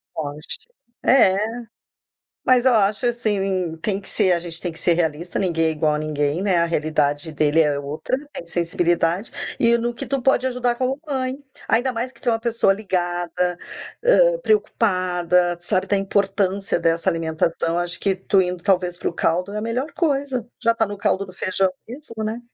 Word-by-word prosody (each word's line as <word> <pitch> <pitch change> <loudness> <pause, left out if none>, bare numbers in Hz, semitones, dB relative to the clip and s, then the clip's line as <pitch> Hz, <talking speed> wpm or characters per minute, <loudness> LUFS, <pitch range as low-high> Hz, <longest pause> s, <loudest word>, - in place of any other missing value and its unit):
Pode, 150 -1 -5 0.6
é. 230 -8 +5 1.1
Mas, 255 -1 +4
ó, 260 - +6
acho, 205 +1 +2
assim, 195 -7 -1
tem 200 -2 0
que 195 - -10
ser, 185 - +3
a 175 - +2
gente 165 -1 -3
tem 175 - -3
que 160 - -7
ser 175 - +3
realista, 165 0 -1
ninguém 165 -4 +1
é - - +2
igual 155 -1 +1
a - - -1
ninguém, 150 +2 -1
né, 195 -3 +2
a 170 - +3
realidade 155 -1 0
dele 150 +1 +2
é 150 -3 +2
outra, 145 - -3 0.2
tem 170 - -7
sensibilidade, 170 +2 0 0.3
e 235 0 +5
no 240 +1 -2
que 270 +3 -5
tu 270 +1 -1
pode 260 0 +3
ajudar 250 -1 0
como 260 +2 -1
mãe, 260 -2 -2 0.3
ainda 250 +3 +2
mais 245 +2 -3
que - - -19
tu 245 - +1
é - - +2
uma 225 - -1
pessoa 230 -4 +2
ligada, 175 -3 -2 0.5
hã, - - +5
preocupada, 180 - +1
sabe 185 +2 0
da 200 - +1
importância 195 -1 0
dessa 165 +2 +1
alimentação, 165 0 -1
acho 175 0 -1
que 195 -1 +1
tu 195 +1 +2
indo 180 -1 -4
talvez 180 -3 +1
para - - -3
caldo 180 +4 0
é 210 - -3
a - - -2
melhor 245 +7 -2
coisa, 280 -6 -1 0.2
já 230 0 +4
tá 225 -1 +1
no 205 0 -6
caldo 200 0 0
do 185 - -12
feijão 185 +1 +1 0.2
mesmo, 230 -4 -7
né. 220 +2 -3
190 Hz, 185 wpm, -22 LUFS, 170-230 Hz, 1.1 s, ó